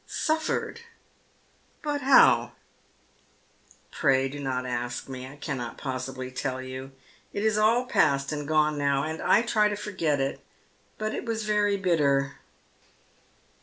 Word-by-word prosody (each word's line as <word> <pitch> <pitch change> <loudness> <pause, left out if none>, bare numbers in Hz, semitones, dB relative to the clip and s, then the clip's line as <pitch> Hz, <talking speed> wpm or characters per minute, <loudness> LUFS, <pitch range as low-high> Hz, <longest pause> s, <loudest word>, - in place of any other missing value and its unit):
" - - -37 0.2
Suffered'? 315 +8 -1 1.0
But 295 -1 -1
how? 265 +1 +5 0.4
" - - -36
" - - -30
Pray 135 0 +3
do 145 +2 -7
not 130 -2 -2
ask 120 -1 -3
me. 130 -1 -7
I 135 - -11
cannot 130 -5 -5
possibly 130 -1 -5
tell 130 0 -3
you. 130 +1 -7 0.4
It 200 - -2
is 220 -1 +2
all 225 +4 +3
pftst 140 - +2
and 150 -1 -4
gone 155 -1 +2
now, 140 -1 +1
and 160 +1 -4
I 215 - +4
try 215 -3 +2
to 205 - -2
forget 185 -8 -1
it. 135 0 -1 0.6
But 215 0 -2
it - - -4
was 225 -1 -2
very 205 -1 +2
bitter." 140 -7 +1
145 Hz, 150 wpm, -27 LUFS, 135-210 Hz, 1.0 s, how